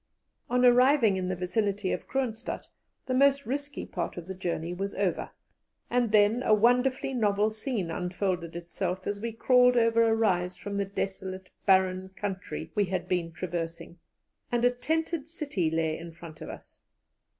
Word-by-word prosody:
On 250 +1 +3
arriving 250 -3 +5
in 185 -1 -2
the 185 - -1
vicinity 195 +2 -1
of - - -3
Kroonstadt, 245 -4 -3 0.4
the 255 - -2
most 280 +1 +4
risky 285 +3 -4
part - - -4
of 175 - -6
the 190 - -5
journey 175 -2 -3
was 195 +2 -4
over, 195 -4 -1 0.6
and 240 -2 +2
then 210 +3 +4
a 220 -4 +4
wonderfully 250 +4 +2
novel 210 -3 +2
scene 215 -5 -3
unfolded 180 -1 -2
itself 180 +2 -3
as 205 0 -2
we 230 +2 -3
crawled 250 +2 +4
over 230 0 +4
a 225 -1 +4
rise 185 -5 +1
from 200 0 -5
the 200 - +1
desolate, 190 -1 -4 0.2
barren 190 -1 +3
country 195 -2 -5
we 205 -1 +2
had 180 -1 -3
been 175 -2 -1
traversing, 170 -1 -5 0.5
and 240 0 +2
a 245 - +5
tented 315 +4 -2
city 285 - -2
lay 160 -1 0
in 170 0 -8
front 165 -1 -12
of - - -7
us. - - -11
200 Hz, 165 wpm, -28 LUFS, 180-245 Hz, 0.6 s, arriving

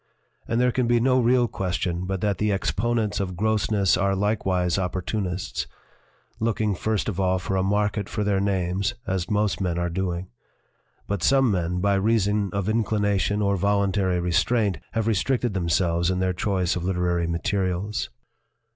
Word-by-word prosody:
And 115 +1 0
there 125 0 +3
can 125 -1 0
be 120 0 +3
no 130 +2 +3
real 125 0 +3
question 90 -3 -2
but 95 -1 -2
that 100 -3 0
the 105 0 +1
exponents 105 +2 0
of 95 -2 -3
grossness 105 -2 +2
are 95 +2 +1
likewise 95 -3 0
opportunists, 90 0 -3 0.7
looking 110 -2 0
first 110 +2 -1
of 100 -4 -3
all 95 -1 +2
for 95 +1 -3
a 95 - +2
market 105 +1 0
for 105 - -2
their; 100 -1 +1
names 95 +2 0
as 95 -1 -2
most 105 -2 0
men 90 -2 -1
are 85 0 -1
doing. 90 0 -3 0.8
But 100 -3 -3
some 135 +5 +4
men, 90 -1 -1
by 100 +1 +2
reason 105 0 +1
of 100 0 -2
inclination 105 -2 +1
or 100 0 +2
voluntary 100 -1 +1
restraint, 95 - +1
have 115 -2 0
restricted 115 +2 0
themselves 85 -1 +1
in 95 - 0
their 95 0 0
choice 95 -2 0
of 90 - -3
literary 90 -2 0
materials." 95 +3 -1
100 Hz, 160 wpm, -24 LUFS, 90-105 Hz, 0.8 s, some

